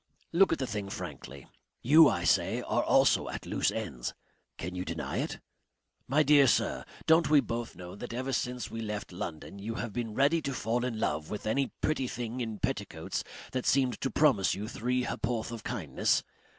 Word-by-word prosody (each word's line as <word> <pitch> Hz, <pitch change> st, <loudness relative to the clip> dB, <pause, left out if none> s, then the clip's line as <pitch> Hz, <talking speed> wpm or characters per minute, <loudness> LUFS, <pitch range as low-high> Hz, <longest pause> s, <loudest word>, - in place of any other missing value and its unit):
Look 190 Hz, +3 st, +5 dB
at -, -, +2 dB
the 130 Hz, -, -1 dB
thing 105 Hz, -4 st, -4 dB
frankly. 70 Hz, -7 st, -7 dB, 0.4 s
You, 155 Hz, +4 st, +8 dB
I -, -, -1 dB
say, -, -, +2 dB
are -, -, +1 dB
also -, -, +4 dB
at -, -, -6 dB
loose -, -, +1 dB
ends. 85 Hz, -, -4 dB, 0.4 s
Can 90 Hz, +2 st, -5 dB
you 90 Hz, 0 st, -3 dB
deny 80 Hz, -5 st, -4 dB
it? -, -, -2 dB, 0.7 s
My 145 Hz, +4 st, +4 dB
dear 145 Hz, -1 st, +6 dB
sir, -, -, +1 dB, 0.2 s
don't 160 Hz, +1 st, +5 dB
we 150 Hz, -1 st, +7 dB
both 120 Hz, -4 st, -3 dB
know 90 Hz, 0 st, -9 dB
that 120 Hz, +4 st, -7 dB
ever 130 Hz, +3 st, -3 dB
since 125 Hz, -1 st, -2 dB
we 115 Hz, -, -4 dB
left 105 Hz, -3 st, -4 dB
London 90 Hz, +2 st, -6 dB
you 110 Hz, +3 st, -4 dB
have 115 Hz, -3 st, -4 dB
been 115 Hz, -2 st, -3 dB
ready 145 Hz, +5 st, +3 dB
to 140 Hz, -3 st, -3 dB
fall 120 Hz, +2 st, 0 dB
in 115 Hz, -3 st, -3 dB
love 75 Hz, -6 st, -1 dB
with 105 Hz, -, -5 dB
any 135 Hz, +5 st, +1 dB
pretty 145 Hz, -4 st, 0 dB
thing 120 Hz, +1 st, -4 dB
in 110 Hz, -3 st, -3 dB
petticoats -, -, -3 dB, 0.3 s
that 130 Hz, -1 st, -2 dB
seemed 130 Hz, -2 st, +2 dB
to 135 Hz, -, 0 dB
promise 135 Hz, -12 st, +3 dB
you 105 Hz, +2 st, -5 dB
three 125 Hz, +3 st, -1 dB
ha'porth 120 Hz, -1 st, -2 dB
of 115 Hz, -3 st, -7 dB
kindness. 95 Hz, -, 0 dB
120 Hz, 190 wpm, -30 LUFS, 100-130 Hz, 0.7 s, You